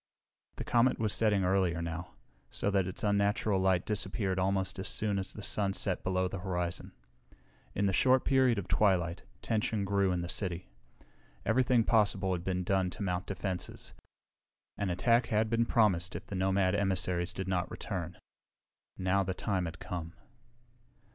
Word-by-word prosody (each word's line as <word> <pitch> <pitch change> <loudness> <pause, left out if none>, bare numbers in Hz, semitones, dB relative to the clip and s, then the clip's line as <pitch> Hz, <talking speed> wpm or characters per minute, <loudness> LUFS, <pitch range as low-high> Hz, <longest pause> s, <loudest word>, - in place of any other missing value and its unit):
The - - -5
comet 120 +2 +3
was 110 -2 0
setting 105 -3 +2
earlier 90 -2 +2
now, 85 +1 -5 0.3
so 100 - -1
that 95 -2 +2
its 95 - -6
unnatural 100 -1 +2
light 95 -1 +2
disappeared 100 -2 -1
almost 95 0 0
as 95 - -3
soon 105 -2 0
as 95 - -4
the 105 - -9
sun 100 -1 0
set 95 -2 -1
below 95 0 +1
the 95 +1 -5
horizon. 90 -1 -3 0.8
In 100 - +1
the 95 - +1
short 130 +6 +4
period 130 -4 +3
of 100 -2 -3
twilight, 90 -5 +2 0.2
tension 110 -2 0
grew 100 -1 +2
in 90 -1 -1
the 85 - -4
city. 90 - -4 0.7
Everything 125 -2 +3
possible 105 -4 +2
had 85 -1 -3
been 90 0 -1
done 95 0 +1
to 100 - -6
mount 90 -1 -2
defenses. 95 -2 -4 0.8
An 100 - -2
attack 115 +7 +2
had 110 0 +1
been 115 0 +2
promised 95 -6 +2
if - - -6
the - - -8
nomad 95 0 +2
emissaries 90 -2 0
did 95 +1 -5
not 90 -2 -1
return. - - -5 0.8
Now 95 +1 +1
the 95 -1 -2
time 95 -3 -1
had 85 +1 -6
come. 85 -1 -6
95 Hz, 165 wpm, -31 LUFS, 90-105 Hz, 0.8 s, short